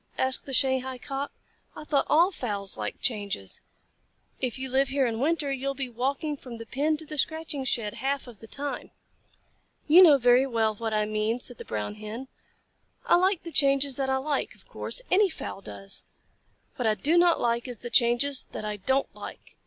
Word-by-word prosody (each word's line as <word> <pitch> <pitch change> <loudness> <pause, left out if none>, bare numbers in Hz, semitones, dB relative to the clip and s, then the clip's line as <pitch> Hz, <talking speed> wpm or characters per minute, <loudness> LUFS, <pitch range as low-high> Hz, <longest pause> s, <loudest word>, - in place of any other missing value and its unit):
asked 260 +1 +1
the - - -5
Shanghai 260 -1 +2
Cock. 275 +2 -4 0.4
"I - - -8
thought 290 -2 +1
all 340 +5 +5
fowls 205 - -3
liked - - -5
changes. 200 - -2 0.8
If 255 -2 -2
you 265 0 -4
live 265 +1 +2
here 270 0 +2
in 225 -2 -2
winter, 295 0 +1
you 270 0 -3
will 275 - -1
be 270 -2 -4
walking 270 +5 -2
from 250 -4 -10
the 230 - -8
pen 295 +6 0
to 320 - -8
the 300 -1 -5
scratching 315 -2 -1
shed 225 -4 -1
half 270 +3 -2
of 240 -5 -13
the 225 - -11
time." 285 +4 -5 1.0
"You 330 +5 +8
know 310 -6 +8
very 250 +1 +4
well 225 -3 +1
what 225 +1 -4
I 215 -1 +1
mean," 215 +2 -1
said 245 -1 -5
the - - -8
Brown 105 -1 -3
Hen. 225 +5 -6 0.8
"I - - +5
like 370 0 +2
the 335 - -7
changes 275 -2 +3
that 270 -1 -1
I 265 - +2
like, 285 +2 -2
of - - -21
course. - - -3
Any 390 +1 +5
fowl 200 - -6
does. 195 0 -3 0.7
What 245 - 0
I 215 - +3
do 305 +9 +1
not 345 -1 +5
like 235 +1 0
is 245 -2 -6
the 240 +2 -8
changes 245 +3 +3
that - - -5
I 210 0 -3
don't 265 +8 0
like." - - -10
265 Hz, 200 wpm, -27 LUFS, 230-285 Hz, 1.0 s, You